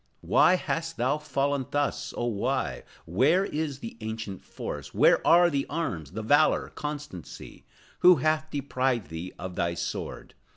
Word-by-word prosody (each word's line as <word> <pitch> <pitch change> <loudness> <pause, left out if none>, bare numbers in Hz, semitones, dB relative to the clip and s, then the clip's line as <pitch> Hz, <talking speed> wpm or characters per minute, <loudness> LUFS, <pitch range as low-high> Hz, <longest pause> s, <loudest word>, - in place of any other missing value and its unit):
Why 185 - +5
hast 165 -2 -3
thou 130 +5 +1
fallen 140 -2 -1
thus, 145 0 -1
oh, 120 - -1
why? 120 +4 -1 0.2
Where 135 - +3
is 150 -5 -3
the 115 - -7
ancient 110 -3 -5
force? - - -7
Where - - +5
are 175 +1 +6
the 140 -1 -1
arms, 90 - -3
the 110 +2 -4
valor, 145 +7 +3
constancy? 150 - -7 0.3
Who 180 0 +8
hath 155 +2 0
deprived 130 -6 -1
thee 80 +3 -6
of 90 0 -6
thy 85 0 -1
sword? - - -5
140 Hz, 150 wpm, -27 LUFS, 110-155 Hz, 0.3 s, Who